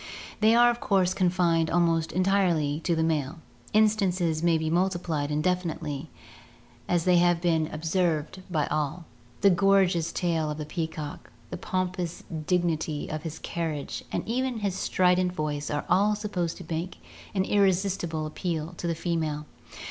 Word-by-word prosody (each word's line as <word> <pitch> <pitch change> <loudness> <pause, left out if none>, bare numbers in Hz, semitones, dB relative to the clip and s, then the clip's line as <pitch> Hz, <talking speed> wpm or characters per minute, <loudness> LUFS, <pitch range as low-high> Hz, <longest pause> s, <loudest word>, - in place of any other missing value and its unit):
They 220 +1 +5
are 240 0 +6
of 240 - -5
course 185 -4 +2
confined 175 -3 +2
almost 165 -2 +2
entirely 180 -6 +2
to 170 - +2
the 160 - +1
male. 155 -1 -1 0.3
Instances 190 -7 +2
may 170 -1 +3
be 160 0 -2
multiplied 170 -4 0
indefinitely, 155 -2 -2 0.8
as 175 -2 +1
they 180 -1 +5
have 175 -1 +4
been 165 -3 +1
ob« 155 +1 -7
120 180 +3 +2
ORGANIC 155 -3 0
EVOLUTION - - -11
served 185 - -19
by 155 -4 +1
all 155 +3 -2 0.2
— 120 0 -28
the 200 -1 +6
gorgeous 190 -3 +3
tail 165 -3 0
of 150 - -4
the 155 - -4
peacock, 155 -2 -5 0.2
the - - -4
pompous 180 -2 -3 0.2
dig 180 -1 +3
nity 155 -3 -2
of 155 - -3
his 160 -1 -6
carriage 160 -4 -4
and - - -3
even 250 0 -1
his 200 -2 0
strident 180 -1 +2
voice 150 -3 -3
are 145 -1 -2
all 205 +4 +3
supposed 190 -5 -3
to 180 - -9
make 170 +2 -4 0.4
an 190 - +2
irresistible 190 -5 +1
appeal 160 +1 -3
to 175 - -3
the 170 - 0
female. 160 -3 -2
170 Hz, 170 wpm, -27 LUFS, 155-185 Hz, 0.8 s, are